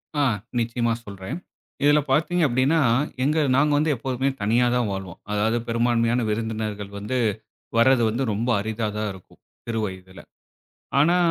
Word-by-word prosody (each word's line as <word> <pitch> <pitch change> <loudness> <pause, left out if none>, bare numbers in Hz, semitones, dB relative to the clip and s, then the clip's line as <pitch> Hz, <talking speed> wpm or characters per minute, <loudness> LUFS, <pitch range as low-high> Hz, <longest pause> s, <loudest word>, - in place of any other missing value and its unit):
ஆ, 145 - +2 0.4
நிச்சியமா 115 0 0
சொல்றேன். 100 - -6 0.5
இதில 145 +1 +5
பார்த்தீங்க 170 +5 +2
அப்டின்னா, 130 +6 +2 0.4
எங்க 150 +3 +2 0.2
நாங்க 145 +3 +3
வந்து, 155 +1 +2
எப்போதுமே 130 +2 -1
தனியா 115 +4 +3
தான் 120 -4 +1
வாழ்வோம். 95 -3 -6
அதாவது 110 +3 +1
பெரும்பான்மையான 115 +1 +1
விருந்தினர்கள் 110 -2 -3
வந்து, 105 +6 -2 0.6
வரது 125 +1 +5
வந்து 115 +5 -1
ரொம்ப 110 +4 -2
அரிதா 110 +1 -2
தான் 105 0 -1
இருக்கும். 95 -1 -16 0.3
சிறு 115 -1 -1
வயதில. 95 -1 -8 0.8
ஆனா, 170 +5 +4
115 Hz, 140 wpm, -24 LUFS, 105-130 Hz, 0.8 s, இதில